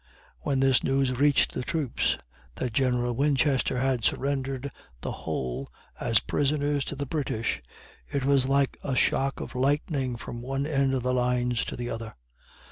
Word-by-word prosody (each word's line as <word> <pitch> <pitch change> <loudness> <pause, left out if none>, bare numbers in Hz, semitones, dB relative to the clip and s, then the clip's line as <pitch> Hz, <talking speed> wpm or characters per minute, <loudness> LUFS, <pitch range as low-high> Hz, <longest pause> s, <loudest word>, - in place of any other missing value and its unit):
When 140 -2 0
this 135 -1 +4
news 135 -1 +2
reached 145 -1 +4
the - - -2
troops, 145 0 0 0.4
that 125 -3 -3
General 125 -1 +2
Winchester 140 0 +2
had 130 -2 +1
surrendered 135 +1 -1 0.3
the - - -3
whole 65 -2 -4 0.3
as 115 -3 +3
prisoners 145 0 +1
to - - -4
the 140 +1 -3
British, 130 -6 -2 0.5
it 140 -2 -1
was 135 -2 +4
like 140 -1 +2
a 135 - -1
shock 135 +1 +2
of - - -6
lightning 135 -1 0
from 120 0 -7
one 135 +2 -2
end 135 -3 +2
of 130 - -1
the 125 0 +1
lines 125 -1 +1
to - - -5
the 120 0 -4
other. 115 -1 -6
135 Hz, 160 wpm, -27 LUFS, 125-140 Hz, 0.5 s, this